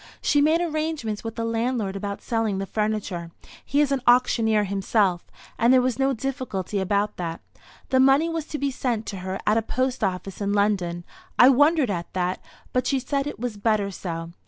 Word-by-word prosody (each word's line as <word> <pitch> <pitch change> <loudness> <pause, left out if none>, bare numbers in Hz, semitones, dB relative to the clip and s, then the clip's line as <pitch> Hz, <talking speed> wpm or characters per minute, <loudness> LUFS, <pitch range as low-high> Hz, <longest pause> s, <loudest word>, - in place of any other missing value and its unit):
She 290 - +2
made 315 +3 +3
arrangements 310 -9 -2
with 225 -1 -5
the 230 - -2
landlord 230 -3 -1
about 200 0 -5
selling 225 -4 -1
the 195 - -2
furniture. 210 -5 -2 0.3
He 285 - +1
is 285 -2 +1
an 275 -2 0
auctioneer 230 -3 +4
himself, 195 -2 0 0.3
and 235 +2 +4
there 260 - +6
was 255 0 0
no 270 0 +3
difficulty 245 -7 -3
about 200 +2 0
that. 165 -2 -4 0.5
The 260 - +3
money 270 +5 +5
was 330 -2 -3
to 300 - -4
be 280 -1 -1
sent 240 -4 -2
to 200 - -5
her 185 +1 -4
at 215 - +3
a - - -2
post 255 +2 -2
office 190 0 -3
in 200 0 0
London. 190 -4 0 0.3
I 250 - +8
wondered 290 -1 +4
at 170 -3 -4
that, 180 0 -1 0.3
but 255 0 +1
she 275 - +2
said 275 +2 -2
it 290 - -6
was 235 -3 -4
better 205 -2 +1
so. 165 -3 -5
225 Hz, 195 wpm, -24 LUFS, 195-265 Hz, 0.5 s, I